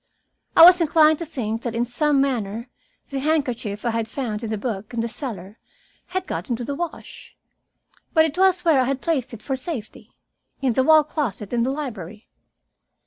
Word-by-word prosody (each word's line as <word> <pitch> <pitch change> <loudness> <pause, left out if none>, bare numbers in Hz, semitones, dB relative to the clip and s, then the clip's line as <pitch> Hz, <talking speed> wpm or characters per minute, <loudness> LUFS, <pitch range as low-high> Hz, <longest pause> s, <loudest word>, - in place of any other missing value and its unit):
I 330 - +10
was 355 +1 +9
inclined 310 -1 +4
to 335 - -5
think 225 -6 -3
that 235 -2 -4
in 235 +1 +1
some 285 +4 +1
manner 235 -3 -1 0.4
the 275 - -2
handkerchief 250 -8 -1
I 235 - +1
had 225 -1 -2
found 230 -3 -4
in 225 - -3
the 215 - -2
book 215 0 -5
in - - -2
the 230 - -1
cellar 215 - -7 0.5
had 370 0 -3
got - - -5
into 240 0 -2
the 285 - -3
wash. 340 +2 -7 0.7
But 320 -1 +5
it 315 -1 -3
was 370 -1 +3
where 315 -5 +5
I - - +1
had 270 +1 -1
placed 275 -5 -1
it 230 -3 -10
for 270 - -2
safety, 260 -5 -8 0.4
in 265 -3 +1
the 260 - +2
wall 310 +2 +6
closet 250 - -4
in 235 - +1
the 245 - +1
library. 220 - -6
260 Hz, 195 wpm, -23 LUFS, 225-305 Hz, 0.7 s, I